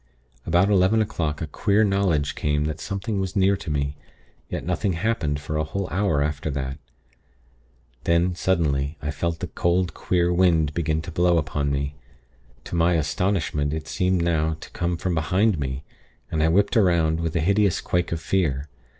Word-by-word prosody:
About 90 +5 +3
eleven 95 +3 +4
o'clock 85 -8 -1
a - - -1
queer 100 +7 +2
knowledge 95 -8 +1
came 75 0 0
that 75 +1 -3
something 100 +1 -3
was 95 -1 -3
near 100 0 +4
to 90 - -7
me; 70 -1 -1 0.5
yet - - -4
nothing 90 +2 0
happened 85 -6 -1
for 75 +1 -4
a 75 - +1
whole 95 +4 -3
hour 90 -6 +1
after 75 +1 -2
that. 70 0 -4 1.3
Then, 85 +2 +2
suddenly, 75 -5 0
I 75 - -3
felt 80 +2 -3
the - - -1
cold, 90 0 0
queer 90 -1 +1
wind 85 -4 +3
begin 80 -1 -1
to - - -7
blow 85 0 +3
upon 70 -2 -1
me. 70 +1 -2 0.7
To - - -6
my 85 +1 +3
astonishment, 75 -2 0
it 80 -1 -4
seemed 90 -1 +1
now 80 -2 +1
to - - -10
come 85 0 -1
from 90 +1 -2
behind 90 +4 +2
me, 65 0 -3 0.5
and 80 - 0
I 80 - +4
whipped 100 +5 +2
'round, 85 -6 +3
with 85 0 -2
a - - +2
hideous 100 +2 +2
quake 90 0 -1
of 85 - -1
fear. 80 -6 -1
85 Hz, 175 wpm, -24 LUFS, 75-95 Hz, 1.3 s, eleven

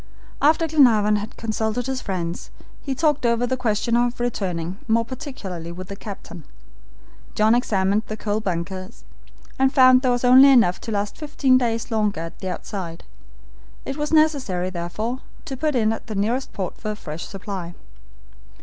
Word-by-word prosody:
After 315 +3 +4
Glenarvan 225 -9 +4
had 210 +2 -6
consulted 220 +1 -2
his 265 0 -2
friends, 175 -3 -4 0.3
he 270 -2 -3
talked 300 -1 +1
over 235 0 +2
the 260 +1 -1
question 235 -2 0
of 240 0 +1
returning, 190 -6 -2
more 230 0 +2
particularly 205 - -7
with 180 +1 -8
the 200 - -5
captain. 195 -5 -9 0.9
John 215 +1 +4
examined 205 -4 +2
the 215 - -5
coal 210 0 -1
bunkers, 185 -1 -5 0.6
and 265 0 +4
found 255 -2 +6
there 260 - +1
was 245 0 +1
only 260 +3 +8
enough 230 -9 +4
to 230 - -5
last 205 -1 -2
fifteen 285 -4 +2
days 230 -1 -2
longer 210 -5 0
at 165 0 -8
the 190 - -4
outside. 180 -4 -6 0.8
It 270 - -4
was 295 0 -3
necessary, 270 - +2
therefore, 200 +8 -3 0.3
to 270 - -5
put 300 +2 -1
in 220 -2 +2
at 225 - -8
the 215 - -5
nearest 235 +7 -1
port 190 -4 -5
for 215 - -4
a 210 - -2
fresh 155 -4 -7
supply. 190 -3 -6
220 Hz, 170 wpm, -23 LUFS, 190-255 Hz, 0.9 s, only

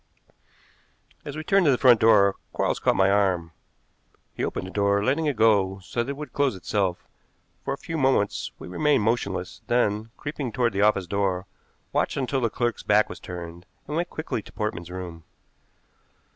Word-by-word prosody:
As 145 +1 -7
we 155 - -4
turned 195 +2 +3
to - - +6
the 130 - +3
front 120 -3 +6
door 100 -3 +5 0.2
Quarles - - 0
caught - - +2
my 95 0 +4
arm. 95 -5 +1 0.8
He - - -4
opened - - -2
the 95 - -8
door, 100 0 +2
letting 145 +7 +1
it 145 - 0
go 100 -4 +3
so 120 - -2
that 120 - -4
it 140 - -4
would 150 0 -8
close 140 -6 +1
itself. 95 -1 -2 0.6
For 135 - -2
a - - -21
few 165 -2 -5
moments 130 -7 +1
we - - -9
remained 140 +6 +2
motionless, 100 -4 -1
then, 110 -2 +1
creeping 145 -4 -4
toward 120 -3 +1
the 100 - 0
office 105 -3 +3
door, 95 0 -1 0.5
watched - - 0
until 135 0 -1
the 115 - +1
clerk's 120 0 -1
back 105 +1 +3
was - - -8
turned, 85 0 -8 0.2
and 150 - -5
went 175 +2 -1
quickly 155 -8 -4
to - - -15
Portman's 105 -6 -4
room. 90 -2 -7
105 Hz, 185 wpm, -25 LUFS, 95-135 Hz, 0.8 s, to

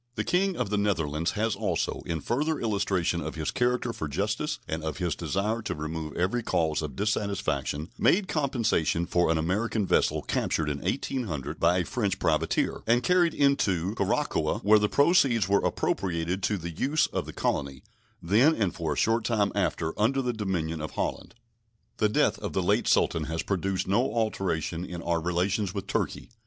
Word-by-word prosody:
The - - -1
King 190 +1 +1
of 120 -5 -2
the 105 - +1
Netherlands 85 -5 0
has 110 +1 0
also, - - -1
in 80 -2 -2
further 150 - 0
illustration 95 -6 0
of 80 +2 -5
his 80 -1 -2
character 125 -1 0
for 80 - -4
justice 105 - -2
and 80 0 -3
of 80 -2 -3
his 85 -3 -1
desire 105 +4 -1
to - - -3
remove 75 0 -5
every 95 +8 +1
cause 80 -8 0
of 75 -4 -5
dissatisfaction, 100 -6 -1
made 190 +2 +3
compensation 115 - 0
for 85 -1 +1
an 80 - +2
American 100 +6 0
vessel - - +2
captured 75 -2 -1
in 70 -1 -4
1800 100 - -3
by 90 - +3
a 90 - 0
French 100 -7 -1
privateer, 80 -1 0
and 120 +2 +3
carried 180 -2 +3
into 100 - +2
Curacoa, - - 0
where 105 +2 +6
the 105 0 +1
proceeds 140 - +4
were 100 0 +2
appropriated 90 0 -1
to 105 +2 0
the 85 -1 -5
use 145 - +1
of - - -3
the - - -6
colony, 70 -1 -2 0.4
then, 115 - +4
and 105 -5 0
for 80 -3 -2
a - - -7
short 115 +1 +2
time 110 -3 +1
after, 80 0 -1
under 135 +5 +2
the 125 -1 -1
dominion 85 -7 -2
of 75 - -5
Holland. - - -3 0.6
The 105 - +2
death 105 - +2
of - - -5
the - - 0
late - - +2
Sultan 80 -2 +2
has 80 +1 -3
produced 95 -1 -1
no 115 +7 +2
alteration 90 -7 -1
in 85 -2 -6
our 85 -1 0
relations 90 +3 0
with 100 - -3
Turkey. - - -3
95 Hz, 180 wpm, -27 LUFS, 80-115 Hz, 0.6 s, where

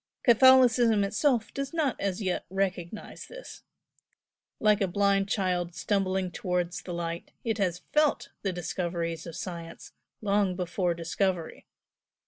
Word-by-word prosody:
Catholicism 240 -3 +6
itself 225 +3 +1
does 275 +3 -4
not 295 -6 +1
as 195 +1 -1
yet 185 -2 -2
recognise 190 0 -3
this. - - -10 1.0
Like 210 -1 +3
a 195 - +3
blind 195 +1 +2
child 180 -4 -1
stumbling 190 -1 0
towards 180 -2 -2
the 180 - -8
light 170 0 -4
it 225 -2 -1
has 180 -2 -1
FELT 300 -1 +2
the 195 - -1
discoveries 170 -1 -3
of 165 - -7
science 170 -2 -7 0.3
long 200 -3 +1
before 180 -1 -1
discovery. 170 0 -2
190 Hz, 125 wpm, -28 LUFS, 175-215 Hz, 1.0 s, Catholicism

